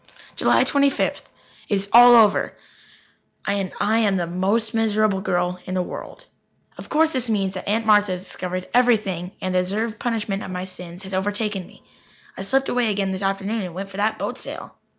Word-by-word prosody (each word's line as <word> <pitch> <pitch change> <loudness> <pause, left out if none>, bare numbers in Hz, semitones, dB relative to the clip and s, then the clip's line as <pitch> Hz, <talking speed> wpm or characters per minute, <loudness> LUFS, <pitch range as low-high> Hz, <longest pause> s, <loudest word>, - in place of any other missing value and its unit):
July - - +3
Twenty 280 0 +3
fifth. - - -2 0.4
It 205 - +2
is 195 0 -1
all 240 +1 +9
over, 220 -3 +4 0.9
and 195 -2 -1
I 215 +3 +2
am 205 -4 +2
the 175 - -1
most 200 +6 0
miserable 215 -3 +1
girl 180 0 -1
in 185 - -4
the 185 - +1
world. - - -9 0.5
Of - - -11
course 320 +1 +2
this 250 -3 -1
means 195 -3 0
that 185 - -7
Aunt 225 +2 0
Martha 205 -3 +4
has 180 0 -6
discovered 185 -1 -5
everything 210 -8 +2
and 185 0 -2
the 185 - +3
deserved 215 +4 -2
punishment 215 -4 -2
of - - -7
my 180 0 -4
sins 180 -1 -9
has 190 0 -9
overtaken 205 0 -2
me. - - -19 0.5
I - - -7
slipped 265 +7 +1
away 245 -2 +1
again 200 -2 -1
this 190 +1 -4
afternoon 195 +3 -1
and 180 -3 -6
went 195 +1 -5
for 195 - -10
that 210 +2 0
boat - - -4
sail. - - -8
200 Hz, 195 wpm, -22 LUFS, 185-225 Hz, 0.9 s, all